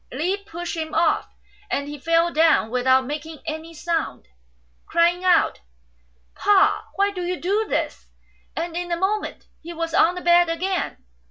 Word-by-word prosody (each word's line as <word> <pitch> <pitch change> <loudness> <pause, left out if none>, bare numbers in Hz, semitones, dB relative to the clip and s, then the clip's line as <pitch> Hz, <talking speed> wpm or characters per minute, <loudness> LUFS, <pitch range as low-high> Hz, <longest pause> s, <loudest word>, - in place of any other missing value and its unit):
Li 335 +9 0
pushed 350 -3 -6
him 315 -1 -4
off, 405 +6 +2 0.4
and 280 0 -2
he 295 0 -7
fell 330 +3 +2
down 315 -8 +3
without 260 +1 +3
making 305 +3 -6
any 315 +1 -5
sound, 330 - -3 0.6
crying 345 +2 +2
out, 365 -1 +3 0.7
"Pa! 405 -2 +3
why 400 +1 +2
do 370 -2 -5
you 360 +1 -2
do 410 +5 0
this? - - -2 0.2
'' - - -37
and 335 0 -3
in 350 0 -3
a 340 - +1
moment 405 +4 -2 0.2
he 340 +1 -8
was 330 0 -4
on 345 +2 +4
the 360 - -5
bed 345 0 +5
again. 365 - -2
335 Hz, 165 wpm, -23 LUFS, 320-360 Hz, 0.7 s, bed